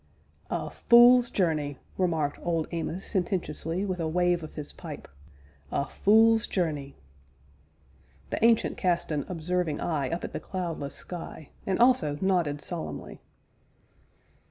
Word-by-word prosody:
"A - - -3
fule's 240 +1 +6
journey!" 155 -7 0 0.2
remarked 160 -6 0
Old 165 -2 -1
Amos 170 +2 -3
sententiously, 180 -2 -1
with 185 -2 -3
a 165 - -1
wave 175 +1 +1
of 155 - -9
his 150 -2 -6
pipe; - - -9 0.6
"a 140 - 0
fule's 225 +4 +4
journey!" 150 -7 -2 1.4
The - - -2
Ancient 230 -1 +3
cast 175 -3 0
an 145 -2 -2
observing 175 -2 -1
eye 150 -6 -1
up 170 +1 -3
at - - -5
the - - -3
cloudless 170 -7 -4
sky, 165 -4 -8 0.2
and 190 - +1
also 235 - +3
nodded 175 -7 +1
solemnly. 170 -2 -6
175 Hz, 130 wpm, -28 LUFS, 155-190 Hz, 1.4 s, fule's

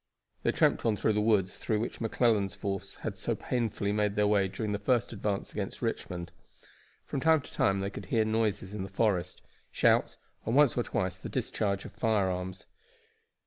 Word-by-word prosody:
They - - +2
tramped - - +2
on 110 -2 +2
through 110 - +2
the 105 - +1
woods 105 -4 +2
through 110 -2 0
which 115 - -4
McClellan's 110 -3 +2
force 100 -1 -4
had - - -3
so - - -1
painfully 110 -4 -1
made 105 -1 +1
their 105 - +3
way 100 -2 +3
during 105 +3 -3
their 100 - -1
first 120 +2 +1
advance 100 -2 -2
against - - -4
Richmond. 85 -1 -3 0.7
From - - -3
time 160 +1 +4
to - - -14
time 95 0 +2
they 100 +1 -2
could 100 -2 -8
hear 110 +1 +2
noises 110 -3 0
in 105 - -4
the 95 - -5
forest 90 -5 0 0.3
shouts, - - +3 0.3
and 115 - -1
once 145 -3 +5
or 120 - +2
twice 95 -5 -2
the - - -6
discharge 100 -2 -1
of - - -8
firearms. 95 -5 -1
105 Hz, 185 wpm, -30 LUFS, 95-110 Hz, 0.7 s, once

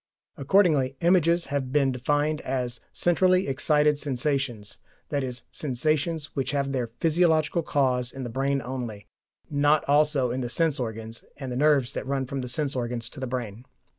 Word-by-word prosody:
Accordingly 140 -4 +3
images 170 -1 +3
have 135 -3 -1
been 140 -1 +3
defined 145 +4 0
as 125 -2 -2
"centrally 185 +2 +2
excited 150 +2 +2
sensations," 135 -6 -2 0.3
i.e. 135 -3 -1 0.2
sensations 155 +3 -1
which 135 0 -1
have 140 -1 0
their 125 -3 -1
physiological 165 0 +2
cause 130 -5 0
in 135 - -7
the 120 - -4
brain 135 +2 0
only, 120 -5 -5 0.5
not 145 +1 +3
also 145 -3 +3
in 130 +2 -2
the 120 - -3
sense 160 +1 +1
organs 115 -1 -5
and 135 -3 -6
the - - -3
nerves 140 -2 +3
that - - -5
run 135 -1 -1
from 135 +1 -4
the 125 - -5
sense 140 +2 -1
organs 120 -2 -3
to 140 - -11
the 130 - -3
brain. 120 -3 -5
135 Hz, 165 wpm, -26 LUFS, 125-150 Hz, 0.5 s, Accordingly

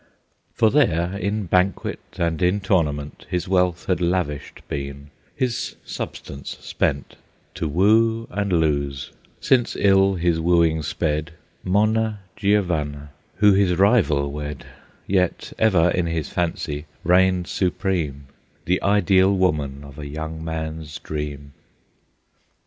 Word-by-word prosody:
For 110 -1 +4
there, 90 - +2
in 100 +2 -2
banquet 90 +2 +1 0.2
and 85 -2 -1
in 90 +3 +2
tournament, 75 -7 -1
His 90 +1 -2
wealth 90 -2 +1
had 90 -2 0
lavished 85 -5 -2
been, 70 0 -6 0.2
his 125 -2 -2
substance 70 0 -6
spent, 70 -1 -2 0.4
To 80 - -3
woo 110 +7 +3
and 100 +1 -2
lose, 70 -5 0 0.3
since 125 -3 +2
ill 95 -1 +4
his 85 -2 +1
wooing 85 -1 +3
sped, 75 +2 -2 0.3
Monna 110 +2 +1
Giovanna, 80 -9 0 0.2
who 105 0 +5
his 95 -2 +3
rival 85 - +3
wed, 75 -1 -6 0.4
Yet 90 -2 0
ever 90 -6 +4
in 90 -1 0
his 80 -2 -2
fancy 80 -3 -2 0.2
reigned 90 +1 +3
supreme, 85 -8 -1 0.4
The 90 +2 +1
ideal 100 -1 +4
woman 75 -8 0
of 70 +1 -12
a 75 - -6
young 80 +2 -6
man's 80 -1 -5
dream. 70 -2 -6
85 Hz, 120 wpm, -22 LUFS, 75-95 Hz, 0.4 s, who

